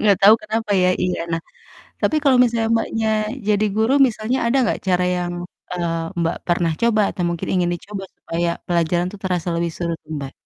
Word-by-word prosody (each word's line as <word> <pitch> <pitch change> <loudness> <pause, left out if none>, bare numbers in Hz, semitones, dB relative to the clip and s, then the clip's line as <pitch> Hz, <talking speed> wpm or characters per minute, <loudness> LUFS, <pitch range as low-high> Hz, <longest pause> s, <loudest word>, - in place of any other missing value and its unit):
nggak 205 -3 +5
tau 205 +2 +9
kenapa 220 0 -3
ya 180 - +4
iya. 180 0 0
Nah, 165 - 0 0.6
tapi 310 - +2
kalau 270 -3 +5
misalnya 230 -2 +1
Mbaknya, 225 0 -1 0.4
jadi 210 0 +3
guru 220 +4 +2
misalnya 230 +2 -2
ada 235 +3 +2
nggak 230 - 0
cara 180 -1 +3
yang, 175 0 -2 0.4
eee, 175 -2 -1 0.3
Mbak, 165 0 0
pernah 175 -1 +1
coba 230 -2 +3
atau 180 - -4
mungkin 170 -1 -4
ingin 180 -2 +2
dicoba, 195 +3 -6
supaya 170 +1 -2 0.2
pelajaran 175 0 +1
tuh 205 - -11
terasa 180 -2 -1
lebih 170 0 -1
seru 170 -1 -2
tuh, 155 - -14
Mbak? 135 -2 -6
185 Hz, 190 wpm, -21 LUFS, 175-220 Hz, 0.6 s, tau